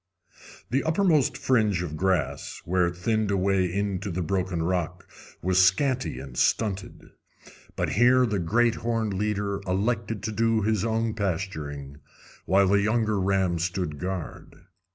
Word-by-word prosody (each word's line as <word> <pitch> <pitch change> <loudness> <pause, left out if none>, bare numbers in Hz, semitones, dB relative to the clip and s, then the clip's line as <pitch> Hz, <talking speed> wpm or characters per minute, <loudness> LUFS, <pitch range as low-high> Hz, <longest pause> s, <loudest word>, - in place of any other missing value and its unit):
"] - - -19
The 135 +3 +1
uppermost 160 -5 +2
fringe 110 -9 +1
of 80 -3 -5
grass, 95 0 -1
where 90 0 +2
it 85 0 -5
thinned 110 +3 0
away 95 -2 +1
into 100 0 -2
the 90 0 -2
broken 90 -1 -1
rock, 90 0 -2 0.4
was 95 +1 +4
scanty 125 - +1
and 65 -1 -9
stunted; 100 - -1 0.6
but - - -1
here 125 +3 +5
the 105 -4 -1
great 115 +7 +2
horned 115 -3 -1
leader 100 0 -1
elected 105 +2 -1
to 110 - -2
do 115 0 +1
his 110 -1 +1
own 115 0 0
pasturing, 75 -9 -4 0.5
while 95 +1 +4
the 100 0 +4
younger 110 -1 +1
ram 95 -2 +1
stood 85 -3 -2
guard. 90 -2 -6
100 Hz, 145 wpm, -26 LUFS, 90-110 Hz, 0.6 s, here